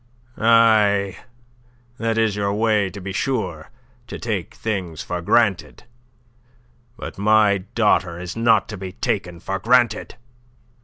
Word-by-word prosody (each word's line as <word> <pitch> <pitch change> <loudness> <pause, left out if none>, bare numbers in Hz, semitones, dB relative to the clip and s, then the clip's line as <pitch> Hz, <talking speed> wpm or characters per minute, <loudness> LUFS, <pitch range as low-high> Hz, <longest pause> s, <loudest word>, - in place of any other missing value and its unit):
Aye, 110 -4 +4 0.8
that 115 0 -1
is 110 -2 +1
your 100 -1 -1
way, 105 -1 +1
to 95 +3 -9
be 95 +1 -6
sure 95 - -3 0.4
to - - -7
take 100 -7 -4
things 95 -8 -4
for 90 0 -4
granted. 105 +1 +1 1.1
But 110 - -8
my 105 -1 +4 0.2
daughter 95 -6 +1
is 90 +1 -6
not 115 -2 +3
to 105 - -6
be 95 -1 -7
taken 95 -7 -3
for 95 +2 -4
granted. 120 0 +2
105 Hz, 125 wpm, -21 LUFS, 95-115 Hz, 1.1 s, Aye